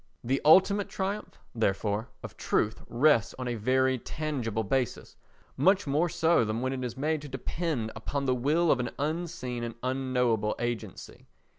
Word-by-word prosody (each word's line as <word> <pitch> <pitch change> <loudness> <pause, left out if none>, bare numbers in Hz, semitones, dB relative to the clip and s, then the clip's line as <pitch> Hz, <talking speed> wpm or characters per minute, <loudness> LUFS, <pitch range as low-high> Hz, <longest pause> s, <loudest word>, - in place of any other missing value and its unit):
The 130 +3 0
ultimate 190 +6 +5
triumph, 200 +2 -4 0.2
therefore, 105 0 -1
of - - -8
truth 110 - 0
rests 120 -2 +3
on 130 -1 -4
a 120 - -1
very 130 +3 +1
tangible 120 -7 -3
basis—much 135 - -1
more 150 +5 +1
so 160 -4 +3
than 110 +1 -2
when 130 +1 -1
it 130 -1 -4
is 125 0 -5
made 155 +2 0
to 145 - -9
depend 135 -2 -3
upon 140 +5 -3
the 130 - +2
will 150 +7 +2
of 125 - +2
an 120 - -1
unseen 150 -5 -3
and 115 -1 -5
unknowable 125 -4 0
agency. 120 -5 -5
130 Hz, 155 wpm, -29 LUFS, 115-155 Hz, 0.2 s, ultimate